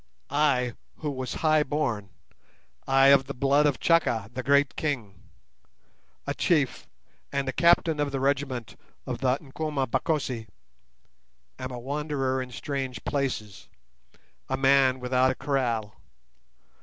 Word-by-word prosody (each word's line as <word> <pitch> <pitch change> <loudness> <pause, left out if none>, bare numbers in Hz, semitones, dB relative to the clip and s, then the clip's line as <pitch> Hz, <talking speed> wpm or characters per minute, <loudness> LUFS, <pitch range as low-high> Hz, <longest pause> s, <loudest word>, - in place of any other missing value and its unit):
I 135 -4 +2 0.2
who 150 -2 -4
was 130 -2 -4
high 155 -1 +5
born, 135 -9 -2 0.8
ay, 135 0 +5
of 140 -1 +5
the 140 - -5
blood 140 +3 +3
of 140 - 0
Chaka, 120 -11 +2
the 130 - -3
great 140 +2 +3
king—a 120 - -8
chief, - - 0 0.4
and 140 -1 -1
a - - 0
captain 170 -1 +3
of 145 -1 0
the 135 - -2
regiment 135 -4 -1 0.3
of - - -4
the 130 0 +2
Nkomabakosi—am 135 -4 -2 1.2
a 125 - -6
wanderer 135 0 -2
in 130 - -6
strange 130 +1 -4
places, 125 -8 -3 0.8
a 130 - 0
man 135 -1 +4
without 125 +1 +2
a 130 - -1
kraal. 120 -7 -2
135 Hz, 120 wpm, -27 LUFS, 125-145 Hz, 1.2 s, high